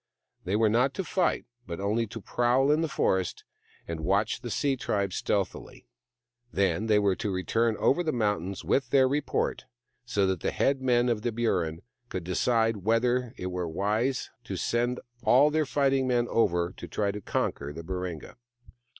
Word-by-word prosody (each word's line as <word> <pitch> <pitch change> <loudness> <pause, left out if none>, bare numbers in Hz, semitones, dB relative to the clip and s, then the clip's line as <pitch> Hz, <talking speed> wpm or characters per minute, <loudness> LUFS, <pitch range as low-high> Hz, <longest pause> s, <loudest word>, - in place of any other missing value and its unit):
They 95 +3 0
were 110 +1 +4
not 125 +5 +2
to 190 - -2
fight, 180 +2 0 0.2
but 85 +1 -5
only 110 +4 0
to 115 +2 -7
prowl 125 +6 +2
in 155 +2 +3
the 165 - +1
forest 95 - 0 0.4
and 85 -1 -4
watch 100 +8 0
the 120 - -5
sea 140 +4 +1
tribe 100 -6 -1
stealthily. - - -2 0.7
Then 100 +2 +1
they 105 -1 +4
were 100 -2 +2
to 105 - -2
return 110 +4 0
over 145 - +3
the 160 -3 0
mountains 105 - -1
with 135 -3 +1
their 135 -1 +5
report, 145 +3 -1 0.4
so 105 -5 +1
that 95 -2 0
the - - -1
head 135 -1 +1
men 125 -1 +3
of 115 -3 0
the 120 +1 -1
Burrin 90 -8 -1 0.3
could 90 -2 -4
decide 115 +5 +1
whether 120 +4 +1
it 90 0 -4
were 90 -1 -2
wise 105 +10 -1
to - - -4
send 120 +1 0 0.2
all 135 +5 +5
their 155 -1 +1
fighting 135 -2 +2
men 120 -1 +2
over 90 -6 +1
to 85 - -7
try 100 +5 -1
and 100 0 -5
conquer 70 -5 -2
the 80 +3 -8
Baringa. 90 -1 -5
110 Hz, 175 wpm, -28 LUFS, 95-125 Hz, 0.7 s, their